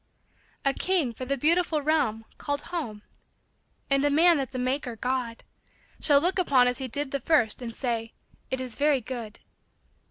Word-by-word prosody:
A 275 Hz, -, +3 dB
king 340 Hz, -10 st, 0 dB
for 255 Hz, +3 st, -7 dB
a 275 Hz, -, +1 dB
beautiful 320 Hz, +1 st, +1 dB
realm 225 Hz, -8 st, +1 dB
called 285 Hz, -1 st, -2 dB
home, 220 Hz, -12 st, -4 dB, 0.8 s
And 275 Hz, 0 st, +2 dB
a 290 Hz, -, +3 dB
man 330 Hz, +3 st, +5 dB
that 270 Hz, -2 st, -2 dB
the 255 Hz, -, -5 dB
maker, 255 Hz, -1 st, -2 dB
God, 245 Hz, 0 st, -3 dB, 0.6 s
Shall 285 Hz, -2 st, +6 dB
look 360 Hz, +5 st, 0 dB
upon 265 Hz, -8 st, +4 dB
as 250 Hz, +1 st, -1 dB
he 265 Hz, -, -3 dB
did 275 Hz, +3 st, -2 dB
the 280 Hz, -, -2 dB
first 255 Hz, -8 st, +2 dB
And 230 Hz, -2 st, -6 dB
say, 230 Hz, -3 st, -3 dB, 0.2 s
" -, -, -34 dB
It 260 Hz, -, -2 dB
is 255 Hz, -2 st, -4 dB
very 285 Hz, +1 st, +2 dB
good." 230 Hz, -3 st, -7 dB
265 Hz, 180 wpm, -27 LUFS, 245-295 Hz, 0.8 s, Shall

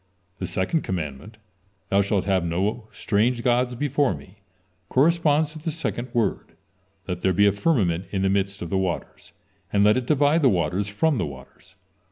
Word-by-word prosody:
The -, -, -3 dB
second 120 Hz, -, 0 dB
commandment: 90 Hz, +4 st, -5 dB, 0.5 s
"Thou 100 Hz, +1 st, +3 dB
shalt 100 Hz, -1 st, 0 dB
have 95 Hz, -3 st, +1 dB
no 100 Hz, +7 st, -2 dB
strange 115 Hz, +3 st, 0 dB
gods 125 Hz, 0 st, +1 dB
before 140 Hz, -, +1 dB
me," 90 Hz, +8 st, -14 dB, 0.5 s
corresponds 155 Hz, +1 st, +2 dB
to 155 Hz, -, -9 dB
the 165 Hz, +2 st, -3 dB
second 140 Hz, -6 st, -4 dB
word: 115 Hz, -4 st, -1 dB, 0.5 s
"Let 90 Hz, -2 st, -4 dB
there 95 Hz, -, +2 dB
be 100 Hz, +4 st, +4 dB
a 100 Hz, -, +5 dB
firmament 100 Hz, -, +1 dB
in 95 Hz, -1 st, -2 dB
the 95 Hz, -, +2 dB
midst 100 Hz, -1 st, -1 dB
of 85 Hz, -, -7 dB
the 95 Hz, -, +1 dB
waters, 90 Hz, -3 st, -4 dB, 0.4 s
and 100 Hz, 0 st, +3 dB
let 105 Hz, +3 st, +5 dB
it 125 Hz, -1 st, -3 dB
divide 150 Hz, +2 st, +3 dB
the 135 Hz, -, +5 dB
waters 95 Hz, +1 st, 0 dB
from 130 Hz, +7 st, +1 dB
the 85 Hz, -, -1 dB
waters." 70 Hz, -2 st, -13 dB
105 Hz, 180 wpm, -24 LUFS, 95-130 Hz, 0.5 s, a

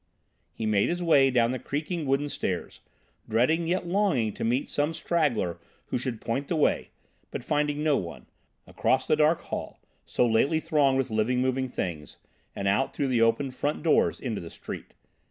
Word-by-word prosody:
He 110 Hz, -, -5 dB
made 105 Hz, -2 st, +2 dB
his 175 Hz, +1 st, -2 dB
way 140 Hz, -5 st, +5 dB
down 120 Hz, -2 st, +3 dB
the 130 Hz, -, -3 dB
creaking 155 Hz, +3 st, -3 dB
wooden 135 Hz, +2 st, +1 dB
stairs, 95 Hz, -10 st, -3 dB, 0.5 s
dreading 155 Hz, +10 st, +2 dB
yet 180 Hz, +1 st, 0 dB
longing 175 Hz, -, +1 dB
to -, -, -5 dB
meet 125 Hz, +4 st, +1 dB
some 150 Hz, +3 st, 0 dB
straggler 130 Hz, -, 0 dB, 0.3 s
who -, -, -1 dB
should 125 Hz, -3 st, -3 dB
point 135 Hz, +5 st, -2 dB
the 170 Hz, -, -1 dB
way, 155 Hz, -, +1 dB, 0.4 s
but -, -, -6 dB
finding 150 Hz, +1 st, 0 dB
no 150 Hz, -2 st, +3 dB
one; 85 Hz, -2 st, -6 dB, 0.4 s
across -, -, +1 dB
the -, -, +3 dB
dark 155 Hz, +2 st, +3 dB
hall, -, -, -6 dB, 0.2 s
so -, -, +1 dB
lately 130 Hz, +7 st, +2 dB
thronged 150 Hz, -5 st, +2 dB
with 135 Hz, -2 st, -1 dB
living, 110 Hz, +4 st, +1 dB
moving 130 Hz, +1 st, 0 dB
things, 85 Hz, -, -5 dB, 0.4 s
and 100 Hz, -, -2 dB
out 105 Hz, +7 st, +1 dB
through 140 Hz, -2 st, 0 dB
the 120 Hz, -3 st, +2 dB
opened 115 Hz, +4 st, +2 dB
front 145 Hz, +3 st, -2 dB
doors 165 Hz, -, +3 dB
into 115 Hz, -6 st, -3 dB
the 85 Hz, -, -8 dB
street. -, -, -9 dB
135 Hz, 180 wpm, -27 LUFS, 115-150 Hz, 0.5 s, way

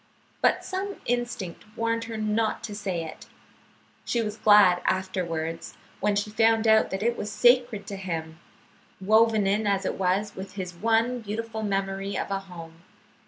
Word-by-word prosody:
But -, -, +2 dB
some 395 Hz, +1 st, -3 dB
instinct 240 Hz, -7 st, -3 dB
warned 230 Hz, 0 st, -1 dB
her 225 Hz, -1 st, -6 dB
not 215 Hz, +1 st, 0 dB
to 215 Hz, -, -5 dB
say 190 Hz, -5 st, -3 dB
it. 160 Hz, -, -10 dB, 0.8 s
She 240 Hz, -, -1 dB
was 215 Hz, -2 st, -2 dB
glad 205 Hz, -5 st, +6 dB
afterwards, 170 Hz, -4 st, -2 dB, 0.2 s
when 210 Hz, -1 st, +1 dB
she 205 Hz, +1 st, -1 dB
found 225 Hz, +1 st, +3 dB
that 220 Hz, -3 st, +3 dB
it 235 Hz, +1 st, +1 dB
was 210 Hz, -2 st, -5 dB
sacred 240 Hz, -4 st, +3 dB
to 200 Hz, -1 st, -6 dB
him, 165 Hz, -3 st, -5 dB, 0.6 s
woven 215 Hz, +1 st, +4 dB
in 205 Hz, +2 st, +1 dB
as 195 Hz, -1 st, +1 dB
it -, -, -2 dB
was 195 Hz, +3 st, 0 dB
with 190 Hz, +1 st, -8 dB
his 185 Hz, -2 st, -5 dB
one 230 Hz, +6 st, +1 dB
beautiful 220 Hz, +1 st, -5 dB
memory 195 Hz, -1 st, -2 dB
of -, -, -3 dB
a 195 Hz, -, 0 dB
home. 170 Hz, -3 st, -11 dB
205 Hz, 160 wpm, -26 LUFS, 190-225 Hz, 0.8 s, glad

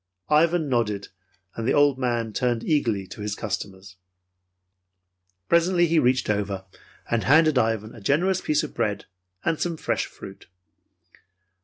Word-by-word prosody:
Ivan 160 Hz, +1 st, +3 dB
nodded, 110 Hz, -6 st, -1 dB, 0.5 s
and 115 Hz, 0 st, -3 dB
the -, -, +2 dB
old 145 Hz, -2 st, +4 dB
man 120 Hz, -3 st, -1 dB
turned 120 Hz, +1 st, 0 dB
eagerly 115 Hz, -11 st, 0 dB
to 105 Hz, -, -10 dB
his 105 Hz, -1 st, -3 dB
customers. 95 Hz, -2 st, -6 dB, 1.5 s
Presently 175 Hz, +1 st, +3 dB
he 165 Hz, -1 st, +3 dB
reached 130 Hz, 0 st, +2 dB
over, 100 Hz, -2 st, -2 dB, 0.5 s
and 115 Hz, -1 st, +1 dB
handed 155 Hz, -1 st, +5 dB
Ivan 110 Hz, -1 st, -1 dB
a 115 Hz, -, -12 dB
generous 175 Hz, -, +1 dB
piece 150 Hz, 0 st, +1 dB
of 155 Hz, -, -6 dB
bread 105 Hz, -3 st, -2 dB, 0.4 s
and 160 Hz, -, 0 dB
some 170 Hz, -2 st, -1 dB
fresh -, -, -1 dB
fruit. -, -, -12 dB
120 Hz, 140 wpm, -24 LUFS, 105-155 Hz, 1.5 s, handed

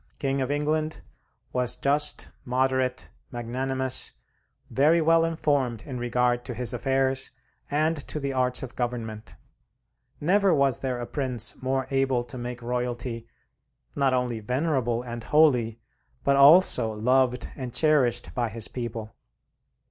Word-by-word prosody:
King 135 Hz, 0 st, -1 dB
of 130 Hz, -, -1 dB
England, 155 Hz, +2 st, -1 dB, 0.5 s
was 125 Hz, -1 st, 0 dB
just, 145 Hz, +2 st, 0 dB
moderate, 130 Hz, 0 st, 0 dB, 0.2 s
magnanimous, 130 Hz, +2 st, -1 dB, 0.6 s
very 155 Hz, +5 st, +4 dB
well 165 Hz, +1 st, +4 dB
informed 145 Hz, -8 st, 0 dB
in 130 Hz, -4 st, -6 dB
regard 120 Hz, 0 st, +1 dB
to 125 Hz, -, -5 dB
his 120 Hz, -1 st, 0 dB
affairs 135 Hz, 0 st, 0 dB, 0.4 s
and 155 Hz, +3 st, +1 dB
to 150 Hz, -, -3 dB
the 140 Hz, -1 st, -3 dB
arts 125 Hz, 0 st, 0 dB
of 130 Hz, -1 st, -8 dB
government; 115 Hz, -3 st, -4 dB, 0.8 s
never 190 Hz, +3 st, +3 dB
was 140 Hz, -3 st, +2 dB
there 130 Hz, -2 st, -3 dB
a 120 Hz, -, -4 dB
prince 125 Hz, -5 st, -1 dB
more 130 Hz, 0 st, -1 dB
able 135 Hz, -2 st, +1 dB
to 130 Hz, +2 st, -9 dB
make 120 Hz, 0 st, -6 dB
royalty 120 Hz, -1 st, -3 dB, 0.7 s
not 140 Hz, -2 st, +2 dB
only 125 Hz, -3 st, -1 dB
venerable 125 Hz, 0 st, -1 dB
and 120 Hz, -2 st, -7 dB
holy, 125 Hz, -8 st, +3 dB, 0.4 s
but 140 Hz, -, +3 dB
also 140 Hz, -5 st, +6 dB
loved 125 Hz, +3 st, +1 dB
and 130 Hz, -3 st, -6 dB
cherished 130 Hz, -4 st, +2 dB
by 120 Hz, -2 st, -1 dB
his 110 Hz, 0 st, -2 dB
people. 115 Hz, -3 st, -6 dB
130 Hz, 135 wpm, -26 LUFS, 120-140 Hz, 0.8 s, also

